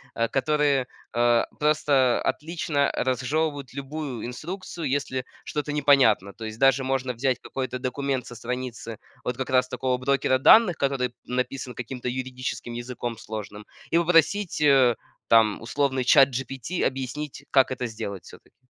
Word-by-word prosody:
э, 115 0 0
которые, 145 -2 +1 0.3
э, 120 0 +3 0.2
просто 145 -4 +3
отлично 155 -3 0
разжевывают 140 +2 -1
любую 140 -3 -5
инструкцию, 165 +5 -5
если 130 -2 -4 0.2
что-то 150 0 -3
непонятно. 135 -9 +4
То 110 - -8
есть 110 0 -6
даже 135 0 +4
можно 130 -1 -1
взять 125 +1 0
какой-то 130 -1 -4
документ 130 0 -2
со 120 - -10
страницы 120 -1 -5 0.3
вот 125 - -1
как 130 +1 -4
раз 125 -1 +3
такого 130 -1 -1
брокера 130 0 +1
данных, 180 - +6
который 135 -3 0
написан 125 0 -3
каким-то 125 +1 -6
юридическим 130 -1 -4
языком 120 -1 -5
сложным, 105 -2 -7 0.3
и 165 - +5
попросить, 170 +2 +2
э, 135 -5 +5 0.3
там 110 -2 +4
условный 130 +2 0
ChatGPT 135 +3 +2
объяснить, 135 +2 -4
как 135 -1 +4
это 125 -1 -2
сделать, 100 -4 -6
всё-таки. 130 - -17
130 Hz, 135 wpm, -25 LUFS, 125-140 Hz, 0.3 s, данных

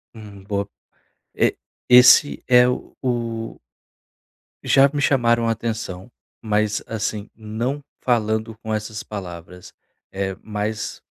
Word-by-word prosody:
Hum, 105 -3 -12
boa. 100 0 -3 0.7
E - - +2 0.4
esse 125 +3 +7
é 125 0 +7
o 120 -3 -3 1.1
Já 135 +1 +6
me 145 - -1
chamaram 120 -5 +2
a - - +3
atenção, 115 -3 -4 0.3
mas 105 -1 0
assim, 110 -1 -3
não 115 +6 -4 0.2
falando 110 -2 0
com 110 -1 -4
essas 105 0 -4
palavras, 90 -3 -9 0.4
eh, 95 0 -4
mas 110 0 -4
110 Hz, 110 wpm, -22 LUFS, 105-120 Hz, 1.1 s, esse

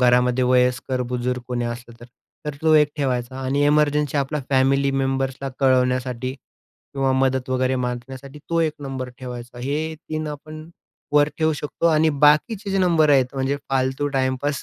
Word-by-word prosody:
घरामध्ये 125 0 +3
वयस्कर, 125 0 +1
बुजुर्ग 125 0 -2
कोणी 120 -1 -2
असलं 120 0 -8
तर 120 - -11 0.4
तर 150 - -3
तो 160 - +4
एक 150 -1 +5
ठेवायचा. 130 -3 -1
आणि 135 +2 -1
एमर्जन्सी 150 0 +2
आपल्याला 140 +1 -2
फॅमिली 135 +1 +3
मेंबर्सला 135 0 -1
कळवण्यासाठी 130 -1 +1
किंवा 135 0 -6
मदत 130 -1 0
वगैरे 130 0 +1
मागण्यासाठी 125 +3 -5
तो 165 0 +2
एक 160 -2 +1
नंबर 135 -2 -5
ठेवायचा. 125 -1 -8
हे 150 +5 -2
3 155 0 -3
आपण 155 +1 -8 0.5
वर 145 0 +5
ठेवू 160 -1 +2
शकतो 150 +2 -2
आणि 160 -1 +4
बाकीचे 195 +8 +3
जे 195 - +1
नंबर 165 -5 +3
आहेत 135 -2 +3
म्हणजे 135 +1 0
फालतू 135 +2 0
टाइमपास 130 +2 -1
135 Hz, 155 wpm, -22 LUFS, 125-150 Hz, 0.5 s, एक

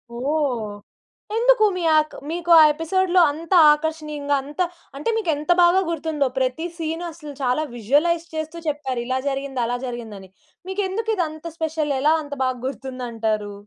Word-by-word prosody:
ఓహ్! 255 -5 -1 0.6
ఎందుకు 475 -1 +4
మీ 360 - -3
ఆక్ 310 0 +1 0.2
మీకు 345 0 -2
ఆ - - +9
ఎపిసోడ్‌లో 360 +3 +2
అంత 330 +5 -5 0.2
ఆకర్షణీయంగా 300 -2 -2
అంత 295 +5 -5 0.4
అంటే 300 +11 -2
మీకేంత 315 -5 0
బాగా 350 +2 +5
గుర్తుందో 310 -3 -1
ప్రతి 260 +6 -1
సీను 325 +1 -3
అసలు 300 -3 -10
చాలా 255 +4 +1
విజువలైజ్ 300 +9 +1
చేస్తూ 315 +2 -4
చెప్పారు 270 -5 -2
ఇలా 255 +1 -1
జరిగింది, 270 -1 -4
అలా 245 +1 -1
జరిగిందని. 220 -6 -7 0.4
మీకెందుకు 405 +3 -2
ఇదంత 315 -1 -3
స్పెషల్ 315 -2 -1
ఎలా 305 +2 +4
అంత 290 0 -8
బాగా 255 -1 -1
గుర్తుందంటారు? 230 -5 -3
300 Hz, 140 wpm, -22 LUFS, 260-335 Hz, 0.6 s, ఆ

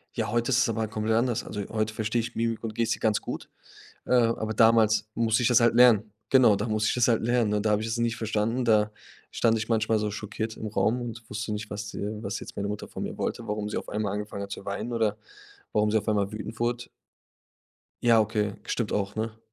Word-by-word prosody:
Ja, 110 -3 -1
heute 120 +1 0
ist 125 - +3
es 135 - +3
aber 115 0 -1
halt 110 0 -3
komplett 110 0 0
anders. 120 -1 +1
Also, 105 - -5
heute 110 0 -1
verstehe 110 +2 0
ich 120 +1 -6
Mimik 115 0 -1
und 110 -1 -4
Gestik 115 +1 -1
ganz 110 -2 +2
gut, - - -6 0.6
äh, - - 0
aber 115 -2 +2
damals 110 -1 +4
musste 115 0 +2
ich 120 - +3
das 120 0 +6
halt 115 -1 +3
lernen. 110 -4 +5 0.2
Genau, 125 -6 +6
da 105 +3 -2
musste 110 0 +1
ich - - +1
das 125 - +3
halt 115 - +2
lernen. 120 -3 +2
Und 105 +1 0
da 105 - +3
habe 105 +1 +2
ich 110 - -3
es 115 - -2
nicht 115 -1 0
verstanden, 110 +3 -1
da 105 -2 +3 0.4
stand 115 -1 +2
ich 110 - -3
manchmal 110 -1 +2
so 105 -1 -1
schockiert 110 +1 -4
im 110 - -5
Raum 105 +4 +1
und 115 -1 -7
wusste 105 +1 -4
nicht, 105 0 -4
was, 105 0 -6
äh 105 +1 -4
was 100 +3 -3
jetzt - - -10
meine 100 0 -2
Mutter 105 - -5
von - - -6
mir - - -5
wollte, 115 - -3
warum 105 0 -2
sie - - -3
auf - - -6
einmal 105 -2 -2
angefangen 105 -1 -4
hat 100 - -8
zu - - -6
weinen 105 +4 -4
oder 110 -2 +1 0.6
warum 105 0 +2
sie 110 - +3
auf 105 +1 -3
einmal 100 -2 +1
wütend 110 +1 -7
wurde. 120 0 -1 1.2
Ja 115 -2 +5
okay, 105 -1 -1
stimmt 115 -4 -2
auch, 100 0 -1
ne? 110 0 -4
110 Hz, 245 wpm, -27 LUFS, 105-115 Hz, 1.2 s, das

